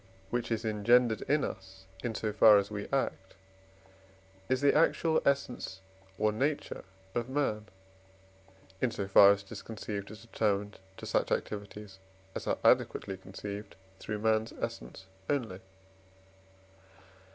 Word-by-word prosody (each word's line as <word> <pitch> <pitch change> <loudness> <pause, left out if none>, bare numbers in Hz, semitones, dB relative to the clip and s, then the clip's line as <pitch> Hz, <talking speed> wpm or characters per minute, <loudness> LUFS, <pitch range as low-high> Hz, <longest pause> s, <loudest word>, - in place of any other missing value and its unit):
which 120 -1 -2
is 115 0 -1
engendered 110 +2 +3
in 145 0 +3
us 95 0 -7 0.2
in 115 -2 -2
so 105 0 -2
far 105 0 +8
as 100 +1 0
we 105 -1 -4
act, 115 -8 -2 1.1
is 130 0 +2
the 140 0 +4
actual 160 0 +3
essence 130 -8 -1 0.4
or 110 +2 +2
nature 140 +7 -2 0.3
of 120 +1 -2
man, 120 -7 -1 1.1
in 130 - +3
so 100 -3 -4
far 100 0 +8
as 100 0 0
it 100 - -20
is 105 - -6
conceived 105 -2 -6
as 110 +1 -11
determined 105 -3 -1 0.2
to - - -8
such - - 0
activities 100 -1 -4 0.3
as - - -6
are - - +1
adequately 95 - +3
conceived 100 +2 -8 0.2
through 105 - -4
man's 110 +1 +1
essence - - -6 0.2
only 120 -10 -1
(III. - - -19
105 Hz, 140 wpm, -31 LUFS, 100-120 Hz, 1.1 s, far